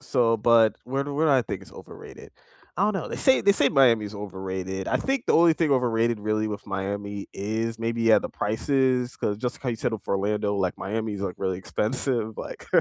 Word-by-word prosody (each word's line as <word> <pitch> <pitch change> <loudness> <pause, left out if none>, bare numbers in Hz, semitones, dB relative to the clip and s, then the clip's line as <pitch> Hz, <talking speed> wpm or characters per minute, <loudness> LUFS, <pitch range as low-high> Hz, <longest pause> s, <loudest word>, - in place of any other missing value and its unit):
So, 115 -2 +2
but 110 -1 +4
where 135 +2 -2
do 145 - -5
where 160 +2 +2
do - - +4
I 130 -2 +4
think - - -5
it's - - -15
overrated? - - -12 0.5
I - - +2
don't 215 - +1
know. 190 - -3
They - - -5
say 265 - +4
they 200 - +5
say 145 -8 +3
Miami's 115 -6 +3
overrated. 95 -1 -5
I - - +2
think 270 -2 -1
the - - +3
only 165 -1 +6
thing 155 -3 0
overrated 115 -3 +1
really 110 +1 0
with 105 0 -6
Miami 100 +1 -4
is 110 +3 -3
maybe, 115 0 -2
yeah, 115 -1 +6
the - - -5
prices, 125 +3 0
'cause 105 0 -2
just 125 +1 -3
how 125 - -1
you 115 - -3
settle 110 -1 -2
for - - -3
Orlando, 105 +1 -1
like, 95 -2 -1
Miami 110 +1 -3
is, 100 - -5
like, 95 -2 -3
really 95 -2 -2
expensive, 110 +2 -2
like - - -8
115 Hz, 220 wpm, -25 LUFS, 100-125 Hz, 0.5 s, only